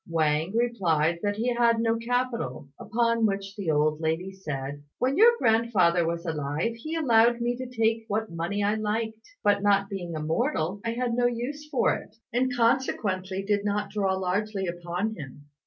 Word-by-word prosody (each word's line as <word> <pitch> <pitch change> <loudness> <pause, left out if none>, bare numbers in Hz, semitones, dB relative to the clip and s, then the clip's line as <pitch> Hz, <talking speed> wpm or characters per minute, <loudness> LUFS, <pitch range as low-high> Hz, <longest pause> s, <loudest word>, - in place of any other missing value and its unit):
Wang 160 +2 +1
replied 170 -9 +1
that 205 0 0
he 240 +3 0
had 235 -1 +3
no 225 0 +2
capital; 230 - -2
upon 230 +1 +1
which 195 0 -3
the 195 -6 -3
old 150 0 +2
lady 165 +4 -1
said, 145 -6 -5 0.2
"When 260 +2 +1
your 455 +6 +7
grandfather 215 - +3
was 170 +1 -3
alive, 155 +6 -1
he 310 +8 -6
allowed 235 -6 +4
me 240 +1 0
to 255 0 -5
take 225 -2 0
what 220 -1 -2
money 170 +5 -2
I 205 +1 +2
liked; 220 +1 -3
but 205 -1 +3
not 200 -1 +3
being 175 -4 -4
a - - -3
mortal, 180 - -1
I 230 0 -1
had 245 0 -1
no 245 +1 +3
use 270 +6 -4
for - - +2
it, - - -8 0.2
and 255 +2 +1
consequently 195 -6 0
did 205 0 0
not 205 0 -1
draw 195 -2 0
largely 195 +2 -1
upon 175 +4 -3
him. 145 -5 -10
205 Hz, 175 wpm, -27 LUFS, 175-235 Hz, 0.2 s, your